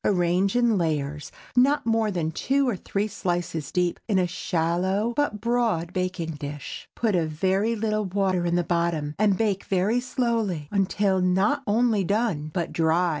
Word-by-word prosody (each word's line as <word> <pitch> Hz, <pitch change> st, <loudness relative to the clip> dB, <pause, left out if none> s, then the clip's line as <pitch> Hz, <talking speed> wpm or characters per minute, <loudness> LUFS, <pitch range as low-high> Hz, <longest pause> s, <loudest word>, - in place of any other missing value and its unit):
Arrange 185 Hz, +1 st, +2 dB
in 235 Hz, -4 st, +3 dB
layers—not 160 Hz, -, 0 dB
more 225 Hz, -1 st, +2 dB
than 170 Hz, -5 st, -1 dB
two 275 Hz, -, +1 dB
or 240 Hz, -, +1 dB
three 200 Hz, +3 st, -2 dB
slices 175 Hz, -6 st, -3 dB
deep—in 180 Hz, +3 st, 0 dB
a 185 Hz, -, +3 dB
shallow 180 Hz, +5 st, -1 dB
but 290 Hz, -7 st, 0 dB
broad 225 Hz, -7 st, 0 dB
baking 180 Hz, -3 st, -2 dB
dish. 145 Hz, -1 st, -7 dB
Put 225 Hz, -3 st, 0 dB
a 165 Hz, -3 st, +1 dB
very 190 Hz, +8 st, 0 dB
little 215 Hz, -1 st, -1 dB
water 185 Hz, -2 st, 0 dB
in 170 Hz, -, +1 dB
the 175 Hz, -, +2 dB
bottom, 170 Hz, -4 st, -1 dB
and 205 Hz, -3 st, +3 dB
bake 205 Hz, -4 st, 0 dB
very 195 Hz, +5 st, +1 dB
slowly 230 Hz, -, -1 dB
until 195 Hz, -1 st, +1 dB
not 190 Hz, +10 st, +2 dB
only 220 Hz, -1 st, +2 dB
done, 200 Hz, -6 st, 0 dB
but 170 Hz, 0 st, -3 dB
dry. 165 Hz, +2 st, +2 dB
190 Hz, 155 wpm, -25 LUFS, 170-220 Hz, -, in